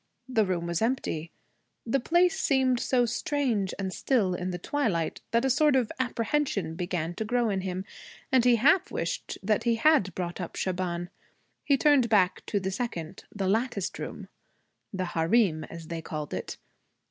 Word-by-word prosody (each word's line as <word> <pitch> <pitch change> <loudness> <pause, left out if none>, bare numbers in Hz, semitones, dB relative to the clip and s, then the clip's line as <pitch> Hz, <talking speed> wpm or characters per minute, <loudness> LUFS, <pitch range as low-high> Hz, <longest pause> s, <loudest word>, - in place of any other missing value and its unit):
The 230 -5 +2
room 175 -2 -1
was 170 -1 -1
empty. 225 -9 -1 0.6
The 240 +4 +1
place 355 +7 +2
seemed 260 -3 +2
so 245 -1 +2
strange 235 -5 0
and 190 -1 -3
still 215 -9 +1
in 180 +1 -3
the 180 - -3
twilight 185 - -1
that 235 +3 +2
a - - +2
sort 295 +2 +4
of 250 -4 +1
apprehension 240 - -1
began 175 -1 -3
to 220 - -3
grow 235 0 +1
in 190 -1 -1
him, 185 0 -4 0.5
and 260 -3 +5
he 245 -1 +5
half 315 - +4
wished - - -3 0.3
he 235 -1 +2
had 230 - +3
brought 175 0 -4
up 175 - -6
Shaban. 175 -1 -2 0.5
He 280 - +3
turned 280 -5 +4
back 185 -4 +3
to 205 - 0
the 190 0 -3
second, 185 -7 -5
the 195 -2 -2
latticed 215 -1 -1
room - - -6 0.6
the 185 -2 -2
harem, 170 0 +2
as 165 -1 -10
they 165 -1 -4
called 155 -2 -5
it. - - -5
210 Hz, 170 wpm, -28 LUFS, 180-255 Hz, 0.6 s, and